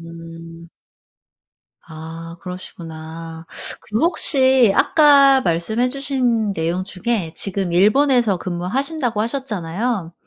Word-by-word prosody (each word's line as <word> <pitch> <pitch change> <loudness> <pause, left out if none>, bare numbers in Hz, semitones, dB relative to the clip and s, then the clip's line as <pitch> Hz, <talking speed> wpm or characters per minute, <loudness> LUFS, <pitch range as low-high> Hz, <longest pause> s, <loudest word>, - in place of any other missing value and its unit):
음. 165 0 -12 1.1
아 165 +1 -10
그러시구나. 165 -2 -9 0.3
그 215 +1 -4
혹시 265 - +4
아까 280 -3 +5
말씀해 200 +9 0
주신 250 -6 -1
내용 170 +1 -2
중에 195 -3 -3
지금 195 -3 -3
일본에서 220 +2 +3
근무하신다고 230 - -3
하셨잖아요. 215 -5 -3
195 Hz, 220 characters per minute, -19 LUFS, 165-250 Hz, 1.1 s, 아까